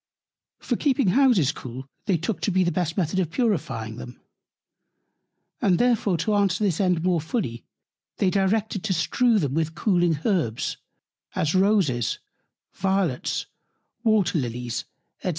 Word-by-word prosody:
For -, -, -2 dB
keeping 270 Hz, -7 st, +2 dB
Houses 235 Hz, -, +4 dB
cool, 130 Hz, -3 st, -8 dB, 0.2 s
they 190 Hz, -4 st, +3 dB
took 175 Hz, +6 st, -3 dB
to 205 Hz, -, 0 dB
be 185 Hz, 0 st, +3 dB
the 175 Hz, -, +1 dB
best 175 Hz, -1 st, -2 dB
Method 185 Hz, 0 st, 0 dB
of 175 Hz, -4 st, 0 dB
purifying 145 Hz, -, -1 dB
them; 125 Hz, 0 st, -9 dB, 1.4 s
and 185 Hz, -3 st, +3 dB
therefore 225 Hz, -6 st, +2 dB
to 215 Hz, -, +1 dB
answer 200 Hz, -1 st, +2 dB
this 190 Hz, -3 st, +1 dB
End 180 Hz, -3 st, +1 dB
more 175 Hz, -3 st, +2 dB
fully, 160 Hz, -, -3 dB, 0.5 s
they 185 Hz, -, +2 dB
directed 200 Hz, +1 st, 0 dB
to 200 Hz, -, +1 dB
strew 225 Hz, +8 st, +2 dB
them 145 Hz, -9 st, 0 dB
with 160 Hz, +1 st, -1 dB
cooling 175 Hz, -4 st, +2 dB
Herbs, 165 Hz, -, 0 dB, 0.6 s
as 155 Hz, -, 0 dB
Roses, 185 Hz, -, +2 dB, 0.6 s
Violets, 190 Hz, -8 st, -1 dB, 0.6 s
Water 210 Hz, -7 st, +2 dB
Lillies, 120 Hz, -2 st, -4 dB, 0.4 s
&c. -, -, -2 dB
180 Hz, 140 wpm, -24 LUFS, 155-205 Hz, 1.4 s, Houses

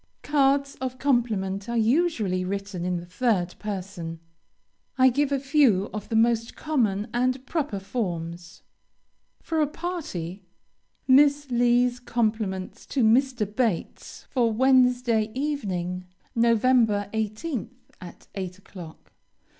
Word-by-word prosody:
Cards 280 Hz, -1 st, +2 dB
of 255 Hz, -1 st, -3 dB
compliment 220 Hz, -7 st, 0 dB
are 235 Hz, -, -1 dB
usually 225 Hz, -, +1 dB
written 195 Hz, -1 st, -4 dB
in 180 Hz, 0 st, 0 dB
the 170 Hz, -, -7 dB
third 180 Hz, -2 st, 0 dB
person. 185 Hz, -5 st, -5 dB, 0.8 s
I 260 Hz, 0 st, +6 dB
give 285 Hz, +3 st, 0 dB
a 280 Hz, -, +1 dB
few 265 Hz, -8 st, +3 dB
of 210 Hz, -1 st, -6 dB
the 225 Hz, -, -1 dB
most 230 Hz, +1 st, +2 dB
common 220 Hz, -9 st, 0 dB
and 255 Hz, +2 st, 0 dB
proper 290 Hz, -10 st, -2 dB
forms. 175 Hz, -5 st, -5 dB, 0.8 s
For 320 Hz, -1 st, 0 dB
a 300 Hz, -, +3 dB
party: 285 Hz, -, -5 dB, 0.7 s
Miss 285 Hz, +1 st, +4 dB
Lee's 245 Hz, +1 st, +3 dB
compliments 215 Hz, -4 st, -2 dB
to 265 Hz, -, 0 dB
Mr. 245 Hz, +1 st, +3 dB
Bates, 215 Hz, -3 st, -3 dB
for 240 Hz, -3 st, +2 dB
Wednesday 250 Hz, -2 st, +3 dB
evening, 185 Hz, -11 st, -2 dB, 0.3 s
Nov. 230 Hz, -1 st, +3 dB
18th, 220 Hz, +1 st, +1 dB, 0.3 s
at 175 Hz, -1 st, -12 dB
8 185 Hz, -1 st, -5 dB
o'clock. 180 Hz, -4 st, -12 dB
230 Hz, 115 wpm, -25 LUFS, 195-260 Hz, 0.8 s, I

